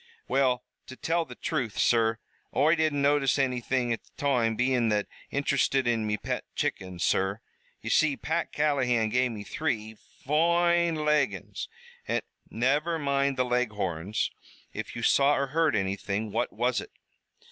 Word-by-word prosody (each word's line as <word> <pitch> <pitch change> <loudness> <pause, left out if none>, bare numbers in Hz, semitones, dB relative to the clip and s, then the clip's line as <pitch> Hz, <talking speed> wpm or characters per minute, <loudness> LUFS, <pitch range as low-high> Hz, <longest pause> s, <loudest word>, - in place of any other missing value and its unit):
"Well, 130 -2 +2 0.2
to 130 - -9
tell 165 +4 0
the - - -10
truth, 130 -10 -3
sur, 115 -1 +3 0.4
Oi 155 +3 +4
didn't 155 -4 +1
notice 140 -1 +3
anythin' 125 -2 0
at 115 - -5
the - - -26
toime, 125 -6 +1
bein' 125 -1 +2
that 105 -1 +1 0.2
interested 140 -2 +1
in 115 -2 +1
me 105 0 0
pet - - -3
chickens, 90 -2 -2
sur. 95 +2 +1 0.4
Ye - - -4
see, 150 -3 +3
Pat 165 +2 -2
Callahan 125 -7 +1
gave 125 +2 +2
me 105 -2 -6
three 110 -6 -2 0.3
foine 170 +3 +3
Leghorns, 150 -2 0 0.4
an' - - 0
" - - -34
"Never 145 +8 +1
mind 140 -2 0
the 130 - +2
Leghorns. 105 -6 -1 0.4
If - - -6
you 120 - -5
saw 140 +4 +4
or 140 - 0
heard 160 -5 +3
anything, 100 +2 -2
what 120 +4 -1
was 120 +3 0
it?" - - -10
130 Hz, 155 wpm, -28 LUFS, 110-145 Hz, 0.4 s, Oi